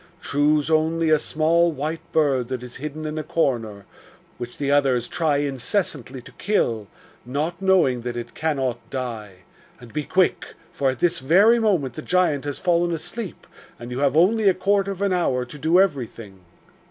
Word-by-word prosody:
Choose 150 +2 +1
only 160 +1 +2
a 155 - +5
small 165 +3 +2
white 155 +2 -4
bird 140 -6 +2
that 130 -1 -4
is 125 -1 -8
hidden 150 +2 -6
in 155 0 -3
a - - -4
corner, 120 - -1 0.5
which 120 0 -7
the 140 -1 -1
others 135 -4 +2
try 160 -4 0
incessantly 135 - -2
to - - -13
kill, 115 - 0 0.4
not 155 +8 -3
knowing 175 -11 +3
that 120 0 -4
it 120 - -6
cannot 135 -6 -1
die. 110 -8 -6 0.4
And, 120 -1 -14
be 150 0 -2
quick! 185 +4 0 0.2
for 135 - +1
at 130 - -3
this 175 +5 +1
very 195 - +5
moment 185 - +1
the 155 - -7
giant 165 -5 +1
has 145 -1 -3
fallen 175 -1 +1
asleep, 185 +5 -5 0.3
and 120 +1 -9
you 125 - -3
have 140 +1 +2
only 205 +4 +4
a 185 - +2
quarter 200 +1 +1
of 195 0 -4
an 200 -2 +1
hour 130 -8 0
to 125 +4 -11
do 160 +5 +3
everything. 115 - -1
150 Hz, 175 wpm, -23 LUFS, 125-170 Hz, 0.5 s, a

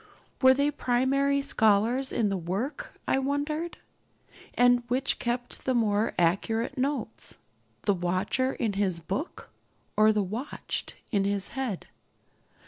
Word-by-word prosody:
Were 260 -1 +7
they 285 +2 +2
primary 275 +2 +1
scholars 225 +4 +3
in 220 -4 +1
the 195 - 0
work, 190 - -4
I 270 - +3
wonder? 290 +4 -1 0.9
And 245 0 +5
which 255 +2 +1
kept 245 +1 -3
the 260 - +1
more 215 -2 +1
accurate 225 +9 +1
notes, 265 -4 -3 0.5
the 205 - +3
watcher 185 +9 0
in 225 -4 -1
his 190 -4 0
book 195 - -5 0.4
or 215 +1 +6
the 210 -1 +1
watched 225 +10 -5 0.2
in 200 -4 +2
his 200 -1 -1
head? 260 -8 -3
240 Hz, 130 wpm, -28 LUFS, 205-270 Hz, 0.9 s, Were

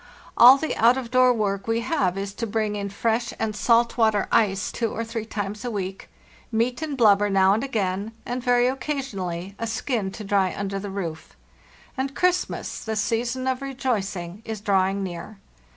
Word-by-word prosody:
All 250 +3 +9
the 315 +3 -2
out 235 +3 +5
of 250 -3 -5
door 255 0 +5
work 200 -4 -1
we 225 0 +1
have 195 - 0
is 195 0 -4
to 230 +2 -4
bring 215 -1 -1
in 200 -1 -3
fresh 230 +4 -1
and 215 -1 -2
salt 235 +4 +2
water 220 -3 +3
ice 195 -4 +2
two 230 -2 -2
or 230 - -3
three 225 -1 -5
times 205 0 -4
a 245 - -2
week, 195 -3 -5 0.4
meat 235 +4 0
and 300 -3 -3
blubber 205 -3 +5
now 195 0 +4
and 220 +4 0
again, 205 -5 -2
and 245 +1 -3
very 245 -1 +3
occa 270 +3 -1
sionally 190 -8 -5
a 230 - -2
skin 225 -2 -2
to 215 - -7
dry 195 -2 +1
under 195 0 -3
the 200 +1 -6
roof. 170 -5 -6 0.6
And 270 0 -3
Christmas, 360 0 0
the 220 -1 -3
season 235 +4 -1
of 260 0 -1
rejoicing, 210 -9 -3
is 220 -2 -5
drawing 195 -1 +1
near. 180 +3 -7
220 Hz, 185 wpm, -24 LUFS, 195-245 Hz, 0.6 s, All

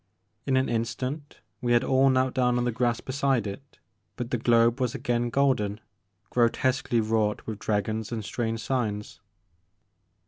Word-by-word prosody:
In 130 -1 +3
an 130 - +2
instant 130 +5 -3 0.2
we 120 -1 +1
had 120 - +4
all 135 +1 +4
knelt 130 0 +2
down 125 -1 +2
on 120 - 0
the 120 - +1
grass 120 0 0
beside 135 -4 0
it, 105 +8 -8 0.4
but 125 0 -5
the 125 - +1
globe 115 +1 +3
was 125 -2 0
again 120 0 -1
golden, 120 -6 +1 0.5
grotesquely 125 0 +2
wrought 110 -1 0
with 110 -2 -5
dra 105 -2 0
gons 110 +1 -4
and 110 -3 -4
strange 115 -1 -2
signs. 110 -6 -3
120 Hz, 160 wpm, -27 LUFS, 110-130 Hz, 0.5 s, had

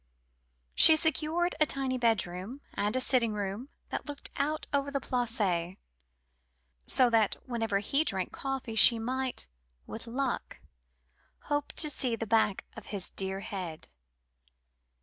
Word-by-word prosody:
She 320 - +8
secured 320 +3 0
a 305 - +4
tiny 265 -2 -1
bedroom, 220 +1 -1
and 210 +3 -1
a - - +1
sitting 245 -4 +2
room 205 +5 -5 0.2
that - - -5
looked 290 -1 -6
out 305 +2 -2
over 280 0 0
the 280 0 -2
Place, 210 -9 -1 1.1
so 250 -2 +5
that 220 -3 +2
whenever 225 -5 -1
he 275 +9 +1
drank 190 - -3
coffee 270 -4 -4
she 230 +1 +8
might, 255 - -3 0.4
with 225 - -8
luck, 255 +2 -3 0.8
hope 290 0 -3
to 310 - +3
see 250 -4 +2
the 225 - -5
back 220 -2 +1
of 225 - -11
his 195 -3 -3
dear 190 0 -2
head. 180 -6 -6
235 Hz, 135 wpm, -29 LUFS, 205-275 Hz, 1.1 s, She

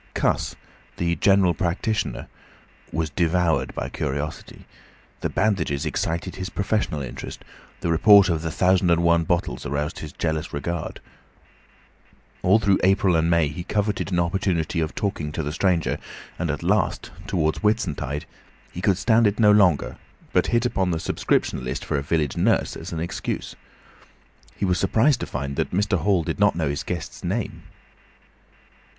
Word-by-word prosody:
Cuss, - - 0 0.4
the 85 0 0
general 95 -1 +4
practitioner, 90 +7 -2 0.7
was 80 -1 -2
devoured 85 +1 +1
by - - -3
curiosity. 70 +2 -5 0.5
The - - -2
bandages 90 -10 0
excited 85 +1 -2
his 95 0 -4
professional 100 -7 -1
interest, 65 - -8 0.4
the 85 - 0
report 100 +4 +7
of 85 -3 0
the 80 - -3
thousand 90 +2 +2
and 85 0 +3
one 85 -1 +3
bottles 85 +1 -1
aroused 75 +5 -3
his 75 - -7
jealous 80 0 -2
regard. 85 +3 -4 1.4
All 95 +4 +5
through 100 -3 +2
April 95 -1 +3
and 80 +1 +2
May 85 -2 +3
he 80 +4 -6
coveted 105 +1 -1
an 90 - +1
opportunity 85 -1 0
of 80 -1 -2
talking 90 -7 -2
to 80 - -2
the 75 - -3
stranger, 85 -1 +1 0.4
and 85 -2 -1
at 75 - -3
last, - - 0 0.2
towards 80 0 0
Whitsuntide, 85 - -1 0.5
he 90 - -6
could 95 -1 +2
stand 115 +1 +4
it 105 +2 -1
no 105 -2 +6
longer, 95 -7 +3 0.4
but - - +3
hit 120 0 +1
upon 95 -6 0
the 80 -2 -1
subscription 65 - 0
list 65 +1 -4
for 70 - 0
a - - -3
village 75 -1 0
nurse - - +1
as - - -7
an 80 - -3
excuse. 85 +1 -4 1.0
He 100 - -1
was 90 -2 +1
surprised 115 +8 +3
to - - -4
find 70 0 -4
that - - 0
Mr. 100 0 +1
Hall 95 -3 +2
did - - -4
not 100 0 +4
know 80 -4 0
his 70 0 -2
guest's - - -6
name. - - -3
85 Hz, 160 wpm, -24 LUFS, 80-100 Hz, 1.4 s, report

